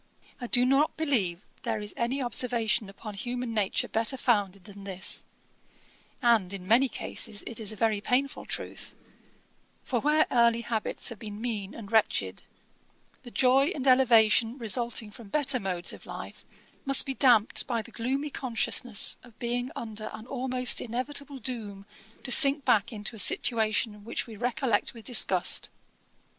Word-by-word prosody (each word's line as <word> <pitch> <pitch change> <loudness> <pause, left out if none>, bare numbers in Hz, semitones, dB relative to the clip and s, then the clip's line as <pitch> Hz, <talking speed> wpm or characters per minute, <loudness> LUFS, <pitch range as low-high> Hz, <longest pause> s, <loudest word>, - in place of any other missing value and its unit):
I 245 - -6
do 245 +1 +3
not 275 +4 +2
believe 210 - -1
there - - -3
is 210 -1 -6
any 255 +3 -2
observation 235 -4 0
upon 210 +2 -9
human 245 +2 -5
nature 205 -3 -1
better 230 +4 -1
founded 200 -7 0
than 200 -1 -12
this; 190 -1 +1 1.0
and, 225 -6 +3
in 185 -2 -9
many 250 +5 +4
cases, 215 -4 -3
it 235 - -7
is 220 -1 -2
a - - -8
very 215 -1 0
painful 270 +5 -1
truth; - - -6 0.9
for 245 - -1
where 305 +1 +3
early 235 -1 +3
habits 230 -2 -3
have 230 - -10
been 210 -2 -8
mean 215 -4 -4
and 210 -3 -10
wretched, 100 - +1 0.8
the 245 - -11
joy 265 +3 +3
and 270 - -4
elevation 235 -2 +4
resulting 235 -2 -1
from 220 0 -12
better 275 0 +2
modes 180 -3 -2
of - - -14
life - - -9 0.4
must 275 -1 +6
be 270 - -3
damped 245 -5 +3
by 235 -3 -2
the 235 - -14
gloomy 270 +6 -3
consciousness 245 -3 +1
of 240 -3 -19
being 245 +1 -3
under 215 -2 -6
an 220 +1 -9
almost 255 -1 0
inevitable 275 +4 -4
doom 215 -5 -6 0.4
to 255 - -6
sink 280 +1 +7
back 215 +2 +2
into 210 +1 -4
a - - -7
situation 215 0 +2
which 230 - -4
we 225 - -11
recollect 240 0 -1
with 225 - -12
disgust. 195 -7 +2
235 Hz, 155 wpm, -27 LUFS, 210-255 Hz, 1.0 s, sink